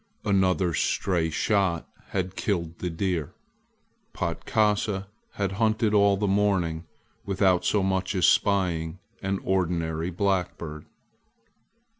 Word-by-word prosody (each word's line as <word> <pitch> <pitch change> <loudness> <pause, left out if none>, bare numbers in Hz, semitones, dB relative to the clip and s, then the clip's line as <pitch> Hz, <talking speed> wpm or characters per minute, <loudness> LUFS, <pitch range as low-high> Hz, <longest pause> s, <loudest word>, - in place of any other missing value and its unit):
Another's 95 -4 +2
stray 85 -4 +1
shot 95 -1 +1 0.2
had 95 -1 -3
killed 85 -5 -2
the 90 - -2
deer. 85 -3 -2 0.8
Patkasa 105 -2 0 0.3
had 100 -2 -1
hunted 110 -1 +2
all 100 -1 +4
the 105 - -1
morning 95 -5 +1 0.4
without 95 -2 +2
so 105 -2 +2
much 95 0 0
as 90 - +3
spying 90 -4 +2 0.2
an 95 0 -1
ordinary 85 -3 0
blackbird. 90 -5 -2
95 Hz, 105 wpm, -26 LUFS, 85-100 Hz, 0.8 s, all